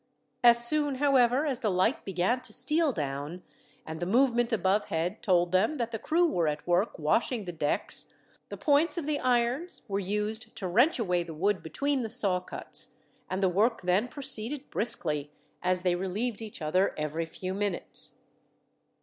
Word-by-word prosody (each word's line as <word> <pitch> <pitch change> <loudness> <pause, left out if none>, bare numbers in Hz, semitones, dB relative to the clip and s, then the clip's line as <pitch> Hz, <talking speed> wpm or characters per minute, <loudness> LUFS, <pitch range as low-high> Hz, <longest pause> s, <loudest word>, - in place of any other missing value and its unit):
As 235 0 +6
soon, 295 0 +1
however, 265 0 +3
as 270 -5 -2
the 215 - 0
light 190 - 0
began 195 +7 0
to - - -8
steal 300 +5 +7
down, 145 - -5 0.4
and 160 0 -7
the 175 - -3
movement 240 +2 +2
above 205 -1 +1
head 170 +6 -3
told 175 -2 +2
them 210 +11 +2
that 235 -2 -3
the 225 - -4
crew 335 +9 +2
were 175 - 0
at 150 0 -3
work 180 +5 +1
washing 210 - 0
the 175 - -4
decks, 150 -3 -1 0.4
the - - -7
points 300 +4 +2
of 335 - -3
the 300 -1 -1
irons 250 +6 0
were 200 -1 -2
used 210 +3 -3
to 190 - -4
wrench 240 - +3
away 180 -7 0
the 165 -2 -7
wood 195 +4 0
between 280 - -1
the 225 - -4
saw 200 -6 +1
cuts; 180 - -7 0.3
and 190 +1 -2
the - - +5
work 210 +5 +1
then 185 +6 +1
proceeded 265 0 -2
briskly, 150 -9 -1 0.3
as 180 0 0
they 180 -1 +2
relieved 200 +6 -3
each 215 -7 -7
other 185 +6 +1
every 155 +2 -3
few 185 +3 -6
minutes. 200 -2 -2
210 Hz, 175 wpm, -28 LUFS, 180-250 Hz, 0.4 s, steal